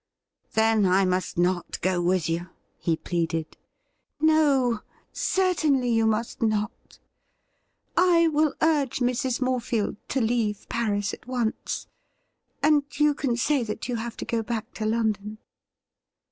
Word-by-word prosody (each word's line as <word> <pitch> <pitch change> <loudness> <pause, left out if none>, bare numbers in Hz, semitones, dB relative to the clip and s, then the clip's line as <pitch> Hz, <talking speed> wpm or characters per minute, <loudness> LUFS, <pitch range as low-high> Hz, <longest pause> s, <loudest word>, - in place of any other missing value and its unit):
' - - -49
Then, 220 -1 +4
I 190 +1 +4
must 185 -1 -1
not 175 0 0
go 180 -1 +1
with 175 -2 +1
you 170 +2 -2 0.2
?'' - - -45
he 165 - +1
pleaded. 165 -2 -2 0.4
' - - -47 0.2
No; 285 -7 +3 0.3
certainly 315 -9 +1
you 225 -1 +3
must 220 +1 -1
not. 215 -1 -2 1.0
I 340 -1 +5
will 305 -1 +1
urge 295 -5 +2
Mrs. 250 +1 0
More 255 -1 +1
field 225 -4 -2
to 270 - 0
leave 225 -3 0
Paris 205 -3 -1
at - - -10
once, 245 -3 -2 0.8
and 300 -1 +4 0.2
you 300 0 +5
can 265 -4 -1
say 280 +2 +2
that 220 -1 -4
you 245 -2 -2
have 230 +1 -5
to - - -5
go 230 -1 -1
back 225 -1 -4
to 215 - -3
London.' 215 -2 -1
230 Hz, 145 wpm, -26 LUFS, 205-270 Hz, 1.0 s, I